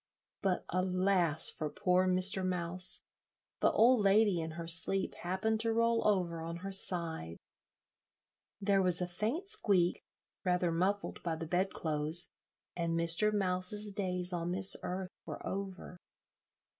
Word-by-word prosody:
But 190 Hz, -3 st, -2 dB
alas 185 Hz, -3 st, +2 dB
for 155 Hz, -, -5 dB
poor 185 Hz, +3 st, 0 dB
Mr. 185 Hz, +1 st, +3 dB
Mouse! 180 Hz, 0 st, +5 dB, 0.6 s
The -, -, +2 dB
old 240 Hz, +1 st, +3 dB
lady 200 Hz, -3 st, +2 dB
in 160 Hz, -, -5 dB
her 165 Hz, -1 st, -7 dB
sleep 185 Hz, +3 st, +3 dB
happened 200 Hz, +5 st, -3 dB
to 225 Hz, 0 st, -1 dB
roll 230 Hz, 0 st, +1 dB
over 175 Hz, -5 st, -1 dB
on 165 Hz, +1 st, -6 dB
her 195 Hz, -, -5 dB
side: 165 Hz, -, 0 dB, 1.2 s
there 200 Hz, -1 st, +1 dB
was 180 Hz, -2 st, +2 dB
a 180 Hz, -, -1 dB
faint 220 Hz, -, -4 dB
squeak, 200 Hz, -, 0 dB, 0.4 s
rather 180 Hz, -1 st, 0 dB
muffled 190 Hz, +5 st, -2 dB
by 165 Hz, -2 st, -3 dB
the 160 Hz, +1 st, -7 dB
bedclothes, 165 Hz, -2 st, 0 dB, 0.5 s
and 170 Hz, -1 st, -2 dB
Mr. 170 Hz, +6 st, +1 dB
Mouse's 200 Hz, +1 st, 0 dB
days 180 Hz, -2 st, -2 dB
on 170 Hz, 0 st, -3 dB
this 190 Hz, +1 st, +1 dB
earth 185 Hz, 0 st, -6 dB, 0.2 s
were -, -, -8 dB
over. 190 Hz, -2 st, -7 dB
185 Hz, 135 wpm, -31 LUFS, 170-200 Hz, 1.2 s, Mouse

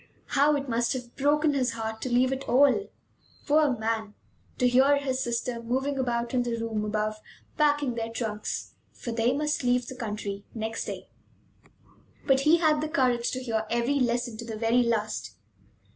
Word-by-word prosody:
How 290 Hz, +1 st, +4 dB
it 280 Hz, -1 st, -3 dB
must 235 Hz, +1 st, +1 dB
have 245 Hz, -2 st, -7 dB
broken 295 Hz, +2 st, +2 dB
his 255 Hz, -4 st, 0 dB
heart 220 Hz, -1 st, -5 dB
to 255 Hz, -, -3 dB
leave 255 Hz, +2 st, +3 dB
it 270 Hz, +1 st, -6 dB
all, 280 Hz, -, +4 dB, 0.6 s
poor 295 Hz, -4 st, +3 dB
man; 220 Hz, -1 st, -2 dB, 0.4 s
to 250 Hz, -, +3 dB
hear 265 Hz, +3 st, +5 dB
his 265 Hz, -2 st, -2 dB
sister 235 Hz, -1 st, -2 dB
moving 265 Hz, +4 st, -1 dB
about 240 Hz, -1 st, -1 dB
in 250 Hz, -, +2 dB
the 240 Hz, -1 st, -2 dB
room 225 Hz, -2 st, -2 dB
above, 215 Hz, 0 st, -1 dB, 0.4 s
packing 290 Hz, -4 st, +2 dB
their 230 Hz, -1 st, -3 dB
trunks! 220 Hz, -2 st, -4 dB, 0.2 s
For 235 Hz, -, -6 dB
they 230 Hz, +1 st, +2 dB
must 300 Hz, +1 st, -1 dB
leave 245 Hz, 0 st, +2 dB
the 260 Hz, -, -8 dB
country 210 Hz, -4 st, -5 dB
next 225 Hz, 0 st, -3 dB
day. -, -, -6 dB, 1.2 s
But 270 Hz, -2 st, +4 dB
he 305 Hz, +5 st, +5 dB
had 310 Hz, -3 st, +2 dB
the 310 Hz, -, -2 dB
courage 250 Hz, -6 st, +1 dB
to 255 Hz, 0 st, -4 dB
hear 220 Hz, -3 st, -1 dB
every 235 Hz, +5 st, +1 dB
lesson 240 Hz, -2 st, 0 dB
to 235 Hz, -, -7 dB
the 225 Hz, -1 st, -5 dB
very 230 Hz, +2 st, +3 dB
last. 215 Hz, -, -1 dB
245 Hz, 175 wpm, -27 LUFS, 230-275 Hz, 1.2 s, hear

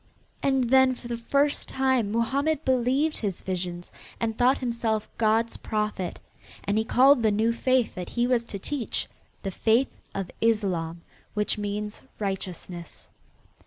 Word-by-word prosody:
And 265 Hz, -3 st, +1 dB
then 260 Hz, -1 st, +6 dB
for 245 Hz, -, -10 dB
the 240 Hz, -, -2 dB
first 280 Hz, +5 st, +1 dB
time 260 Hz, -5 st, +1 dB
Mohammed 275 Hz, +7 st, 0 dB
believed 260 Hz, +5 st, +2 dB
his 200 Hz, -5 st, -3 dB
visions 175 Hz, -1 st, -4 dB, 0.3 s
and 225 Hz, -1 st, -1 dB
thought 250 Hz, +3 st, +4 dB
himself 230 Hz, -3 st, -1 dB
God's 225 Hz, +1 st, +2 dB
Prophet, 210 Hz, -4 st, -2 dB, 0.5 s
and 205 Hz, +2 st, +1 dB
he -, -, +1 dB
called 260 Hz, +3 st, +5 dB
the 220 Hz, -, +4 dB
new 220 Hz, +3 st, +2 dB
faith 255 Hz, 0 st, +2 dB
that 180 Hz, -1 st, -6 dB
he 240 Hz, 0 st, +1 dB
was 245 Hz, -2 st, +2 dB
to 210 Hz, -, -6 dB
teach 250 Hz, +5 st, -3 dB, 0.4 s
the 195 Hz, -, -2 dB
faith 225 Hz, +7 st, +2 dB, 0.2 s
of 195 Hz, -2 st, -3 dB
Islam, 180 Hz, -7 st, 0 dB, 0.3 s
which 210 Hz, 0 st, 0 dB
means 210 Hz, +1 st, -3 dB, 0.2 s
righteousness. 185 Hz, -3 st, -5 dB
230 Hz, 145 wpm, -26 LUFS, 205-255 Hz, 0.5 s, then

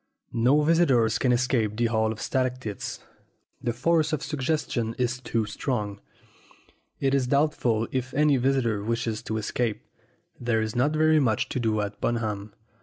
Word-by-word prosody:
No 130 Hz, +6 st, +3 dB
visitor 150 Hz, -8 st, +4 dB
can 125 Hz, +3 st, +1 dB
escape 120 Hz, -4 st, +1 dB
the 120 Hz, -, +2 dB
Hall 110 Hz, -1 st, +1 dB
of 110 Hz, -, -7 dB
Stalactites 130 Hz, -5 st, -2 dB, 0.6 s
the 120 Hz, -3 st, 0 dB
force 155 Hz, +5 st, +1 dB
of 155 Hz, -, -1 dB
suggestion 130 Hz, -6 st, -1 dB
is 125 Hz, 0 st, -1 dB
too 115 Hz, -3 st, -1 dB
strong. 105 Hz, -2 st, -3 dB, 1.0 s
It 135 Hz, -1 st, +1 dB
is 135 Hz, -2 st, +2 dB
doubtful 125 Hz, -6 st, +1 dB
if 130 Hz, 0 st, -2 dB
any 150 Hz, -1 st, +4 dB
visitor 120 Hz, -5 st, +1 dB
wishes 115 Hz, -1 st, -2 dB
to 110 Hz, -, -3 dB
escape. 110 Hz, +1 st, -2 dB, 0.5 s
There 120 Hz, -2 st, +1 dB
is 110 Hz, 0 st, -2 dB
not 135 Hz, +5 st, +2 dB
very 155 Hz, 0 st, +4 dB
much 115 Hz, -7 st, +1 dB
to -, -, -2 dB
do 110 Hz, -3 st, +1 dB
at 105 Hz, 0 st, -5 dB
Bunham. 105 Hz, -3 st, -2 dB
120 Hz, 155 wpm, -26 LUFS, 110-135 Hz, 1.0 s, visitor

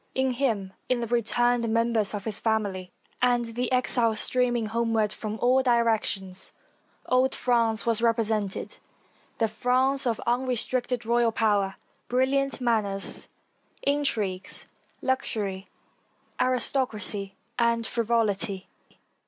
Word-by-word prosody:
In 265 Hz, 0 st, +2 dB
him, 225 Hz, -7 st, -1 dB, 0.2 s
in 255 Hz, -1 st, +2 dB
the 235 Hz, -, -2 dB
returned 240 Hz, +1 st, +1 dB
members 230 Hz, -2 st, +1 dB
of 205 Hz, -, -6 dB
his 215 Hz, -3 st, -1 dB
family, 200 Hz, -5 st, -1 dB, 0.3 s
and 245 Hz, -1 st, +3 dB
the 245 Hz, +2 st, -2 dB
exiles 240 Hz, -3 st, +2 dB
streaming 245 Hz, -2 st, +1 dB
homeward 225 Hz, -1 st, 0 dB
from 215 Hz, 0 st, -5 dB
all 255 Hz, +2 st, +4 dB
directions, 220 Hz, -6 st, 0 dB, 0.5 s
old 255 Hz, +1 st, +2 dB
France 230 Hz, -3 st, +1 dB
was 230 Hz, -1 st, +2 dB
represented 220 Hz, -4 st, 0 dB, 0.3 s
— -, -, -35 dB
the 225 Hz, -, +2 dB
France 255 Hz, +5 st, +1 dB
of 230 Hz, -2 st, 0 dB
unrestricted 245 Hz, 0 st, 0 dB
royal 235 Hz, 0 st, +3 dB
power, 205 Hz, -3 st, +1 dB, 0.3 s
brilliant 265 Hz, +2 st, +1 dB
manners, 215 Hz, -5 st, +1 dB, 0.6 s
intrigues, 220 Hz, -10 st, -1 dB, 0.4 s
luxury, 205 Hz, -7 st, -2 dB, 0.7 s
aristocracy, 225 Hz, -6 st, 0 dB, 0.2 s
and 235 Hz, -1 st, +2 dB
frivolity. 210 Hz, -4 st, 0 dB
230 Hz, 110 wpm, -26 LUFS, 210-250 Hz, 0.7 s, all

